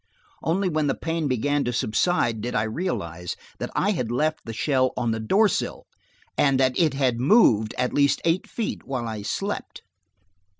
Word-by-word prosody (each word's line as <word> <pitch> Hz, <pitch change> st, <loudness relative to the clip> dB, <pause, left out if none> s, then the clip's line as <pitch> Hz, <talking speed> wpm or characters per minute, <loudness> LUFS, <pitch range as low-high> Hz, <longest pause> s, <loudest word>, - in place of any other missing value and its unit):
Only 185 Hz, +4 st, 0 dB
when 155 Hz, -3 st, 0 dB
the 135 Hz, -, +1 dB
pain 165 Hz, -2 st, -2 dB
began 140 Hz, +3 st, +1 dB
to 125 Hz, -, -1 dB
subside 115 Hz, 0 st, +1 dB
did 120 Hz, +2 st, -3 dB
I 105 Hz, -, +2 dB
realize 90 Hz, -, -3 dB, 0.2 s
that -, -, -3 dB
I 205 Hz, -, +2 dB
had 125 Hz, -, -2 dB
left 155 Hz, +5 st, 0 dB
the 115 Hz, -, -5 dB
shell 130 Hz, +2 st, +1 dB
on 120 Hz, -2 st, 0 dB
the 110 Hz, -, -2 dB
door 195 Hz, -, +3 dB
sill, 195 Hz, -, -3 dB, 0.5 s
and 135 Hz, -2 st, +3 dB
that 130 Hz, -1 st, +3 dB
it 155 Hz, -5 st, +3 dB
had 130 Hz, -4 st, +1 dB
moved 125 Hz, -, +4 dB
at 125 Hz, 0 st, 0 dB
least 140 Hz, -1 st, +3 dB
eight 170 Hz, +2 st, +1 dB
feet 230 Hz, -, -4 dB
while 125 Hz, -3 st, -3 dB
I 110 Hz, -2 st, -4 dB
slept! 195 Hz, -, -4 dB
135 Hz, 180 wpm, -24 LUFS, 115-165 Hz, 0.5 s, moved